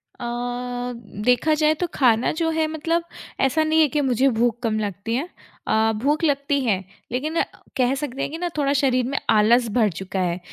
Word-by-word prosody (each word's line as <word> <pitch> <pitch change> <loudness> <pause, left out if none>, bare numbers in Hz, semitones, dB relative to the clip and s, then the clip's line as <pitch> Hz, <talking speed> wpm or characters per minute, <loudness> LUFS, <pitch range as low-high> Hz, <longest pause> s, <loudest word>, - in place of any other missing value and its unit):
अ, 245 +1 -4 0.3
देखा 250 +6 +3
जाए 305 0 +3
तो 355 - +1
खाना 240 -3 +3
जो 325 - +2
है 320 -1 +1
मतलब 330 +2 -1 0.4
ऐसा 270 +4 +2
नहीं 315 +1 +3
है 305 - +5
कि 295 +2 0
मुझे 265 0 +2
भूख 240 -1 +1
कम 215 -2 0
लगती 205 +2 -3
है 315 +8 -2 0.4
अ, 220 +1 +3
भूख 300 +4 +1
लगती 280 -1 +1
है 195 -4 +1 0.3
लेकिन 305 +7 -1 0.4
कह 255 +1 +2
सकते 275 -1 -4
हैं - - -1
कि 325 - -5
ना 355 - -2
थोड़ा 280 -1 +1
शरीर 255 -3 +2
में 275 - -2
आलस 230 +3 +4
भर 220 -2 +3
चुका 190 +2 -5
है, 180 -1 -1
255 Hz, 195 wpm, -23 LUFS, 230-300 Hz, 0.4 s, है